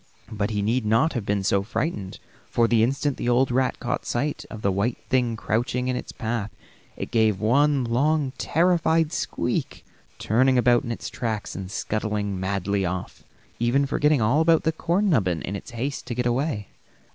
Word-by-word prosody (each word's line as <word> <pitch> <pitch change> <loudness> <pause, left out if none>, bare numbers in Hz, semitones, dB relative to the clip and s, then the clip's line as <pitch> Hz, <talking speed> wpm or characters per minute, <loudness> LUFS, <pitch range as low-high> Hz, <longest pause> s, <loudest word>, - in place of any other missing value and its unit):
But 105 -2 -1
he 105 -2 -1
need 115 +4 +1
not 115 +9 +2
have 120 -7 -4
been 100 -1 0
so 100 0 +2
very 100 +4 -13 0.2
frightened, 95 - -8 0.3
for 115 -1 +3
the 115 -1 +3
instant 135 +4 0
that - - -3
old 125 +1 +3
rat 130 +1 +1
caught 125 0 -2
sight 145 +4 -2
of 110 -1 -9
the 100 - +2
white 100 +6 0
thing 125 -3 +1
crouching 120 +3 -1
in 130 - 0
its - - -5
path 115 -3 -3 0.5
it - - -5
gave 110 -4 +2
one 140 +5 +3
long, 140 +4 +1
terrified 165 -1 +2
squeak, - - -2 0.3
turning 130 +4 +2
about 120 0 +4
in 120 - -4
its 115 - -5
tracks 110 -4 -3
and 95 -1 -6
scuttling 105 -1 -2
madly 100 +1 -1
off, 90 0 -4 0.4
even 120 +4 +2
forgetting 145 -2 +2
all 130 +8 +3
about 165 0 +4
the 160 - +2
corn 175 +5 0
nubbin 95 - +1
in 100 - -4
its 100 - -7
haste 125 +1 -4
to 120 - -3
get 125 0 -1
away. 120 - -1
120 Hz, 185 wpm, -24 LUFS, 105-135 Hz, 0.5 s, about